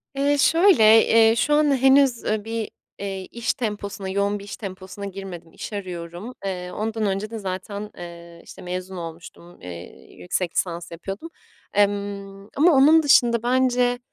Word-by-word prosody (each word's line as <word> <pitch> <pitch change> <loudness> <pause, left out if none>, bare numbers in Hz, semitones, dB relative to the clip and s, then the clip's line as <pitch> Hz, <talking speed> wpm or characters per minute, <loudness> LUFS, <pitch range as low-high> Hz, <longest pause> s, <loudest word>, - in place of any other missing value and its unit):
Eee, 285 +1 +2
şöyle, 335 - +5 0.2
eee, 225 0 +5
şu 295 +6 +1
an 295 -2 +3
henüz, 265 -1 +4
ııı, 215 0 -1
bir, 225 -1 -3 0.3
eee, 195 -1 -4
iş 235 +3 -2
temposuna, 205 -5 -4
yoğun 200 +1 0
bir 200 - -10
iş 200 - -8
temposuna 195 0 -8
girmedim, 190 -4 -8
iş - - -8
arıyorum. 180 +3 -6
Eee, 180 -1 -4
ondan 220 +1 -2
önce 195 +2 -2
de 225 - -6
zaten, 200 +2 -5
eee, 170 -1 -10
işte, - - -13
mezun 180 +1 -5
olmuştum, 170 +1 -10
eee, 90 -1 -11
yüksek 165 - -2
lisans 170 -1 -2
yapıyordum, 195 - -7 0.4
emm, 200 -1 -1
ama 325 +5 +5
onun 305 +4 +6
dışında 235 -5 +4
bence 245 -1 +2
200 Hz, 155 wpm, -23 LUFS, 185-240 Hz, 0.4 s, onun